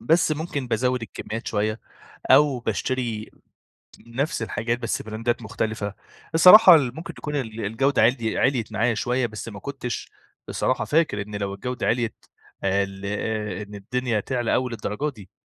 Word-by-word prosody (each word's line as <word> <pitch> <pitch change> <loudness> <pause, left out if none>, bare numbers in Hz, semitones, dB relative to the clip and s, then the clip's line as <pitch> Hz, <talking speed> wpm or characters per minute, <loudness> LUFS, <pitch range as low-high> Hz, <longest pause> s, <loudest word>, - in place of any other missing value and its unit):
بس 155 +6 +3
ممكن 150 -3 -3
بازوّد 125 +2 0
الكميّات 115 +1 -6
شويّة 110 +1 -1 0.5
أو 145 -4 +5
باشتري 120 -3 -2 0.8
نفْس 135 +5 -2
الحاجات 115 +1 -2
بس 120 -2 -2
براندات 115 +2 -2
مختلِفة. 110 -2 -3 0.4
الصراحة 185 +3 +10
اللي 135 -6 +3
ممكن 160 +3 -7
تكون 150 -1 -4
ال 115 -5 -4
الجودة 115 +6 +1
عِلي 115 -1 +2
عِلْيت 120 -5 +1
معايا 115 +2 +1
شويّة 125 +3 0
بس 110 0 -7
ما 100 -3 -8
كنتش 135 -1 -5 0.4
بصراحة - - 0
فاكر 150 -10 +1
إن 105 +1 -10
لو 100 -1 -3
الجودة 125 +5 -4
عِلْيت 115 -1 -1 0.4
ال 100 0 0
أ 105 -1 -3
إن 105 0 -10
الدنيا 120 +2 -1
تعلى 120 +1 -1
أوي 125 -1 0
الدرجات 115 +6 -3
دي، 100 -5 -14
115 Hz, 150 wpm, -24 LUFS, 105-130 Hz, 0.8 s, الصراحة